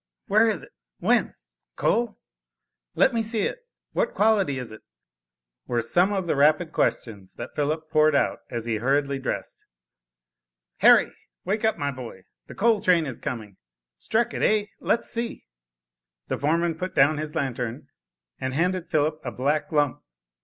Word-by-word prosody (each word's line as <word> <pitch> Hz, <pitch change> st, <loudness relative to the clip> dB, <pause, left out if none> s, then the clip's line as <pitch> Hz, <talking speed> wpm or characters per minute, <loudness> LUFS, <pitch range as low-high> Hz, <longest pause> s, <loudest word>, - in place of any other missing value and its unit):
Where 215 Hz, +3 st, +4 dB
is 220 Hz, -, -1 dB
it? -, -, -14 dB, 0.3 s
When? -, -, +1 dB, 0.4 s
Coal? 235 Hz, -2 st, 0 dB, 0.8 s
Let 265 Hz, -, +4 dB
me 230 Hz, -, +1 dB
see 220 Hz, 0 st, -1 dB
it. -, -, -2 dB, 0.3 s
What -, -, 0 dB
quality 205 Hz, -10 st, +2 dB
is 125 Hz, -3 st, -5 dB
it?" 110 Hz, -, -11 dB, 0.9 s
were 120 Hz, -1 st, 0 dB
some 175 Hz, -, +3 dB
of 195 Hz, -3 st, -1 dB
the 165 Hz, -, 0 dB
rapid 155 Hz, +4 st, +3 dB
questions 100 Hz, -11 st, -2 dB
that -, -, -7 dB
Philip 155 Hz, +2 st, -1 dB
poured 155 Hz, -1 st, +4 dB
out -, -, +1 dB
as 115 Hz, -2 st, -4 dB
he 115 Hz, -2 st, -1 dB
hurriedly 140 Hz, +4 st, +1 dB
dressed. 135 Hz, -, -4 dB, 1.2 s
"Harry, -, -, +6 dB, 0.3 s
wake 210 Hz, +4 st, -1 dB
up, 220 Hz, -1 st, +2 dB
my 145 Hz, -1 st, -1 dB
boy, 120 Hz, -8 st, -9 dB, 0.2 s
the -, -, -10 dB
coal 220 Hz, -1 st, +3 dB
train 175 Hz, -3 st, +3 dB
is 130 Hz, -5 st, -6 dB
coming. 110 Hz, -6 st, -6 dB, 0.4 s
Struck 230 Hz, +2 st, 0 dB
it, -, -, -4 dB
eh? 210 Hz, -1 st, +3 dB
Let's 230 Hz, -, 0 dB
see?" 235 Hz, 0 st, -4 dB, 0.8 s
The -, -, -1 dB
foreman 165 Hz, +2 st, 0 dB
put 185 Hz, 0 st, -4 dB
down 145 Hz, +2 st, +4 dB
his 155 Hz, 0 st, -5 dB
lantern, 125 Hz, -5 st, -3 dB, 0.5 s
and 130 Hz, 0 st, -3 dB
handed 180 Hz, +2 st, 0 dB
Philip 155 Hz, +1 st, 0 dB
a 125 Hz, -, -3 dB
black 140 Hz, +6 st, -1 dB
lump. 145 Hz, -4 st, +1 dB
155 Hz, 160 wpm, -25 LUFS, 130-195 Hz, 1.2 s, Harry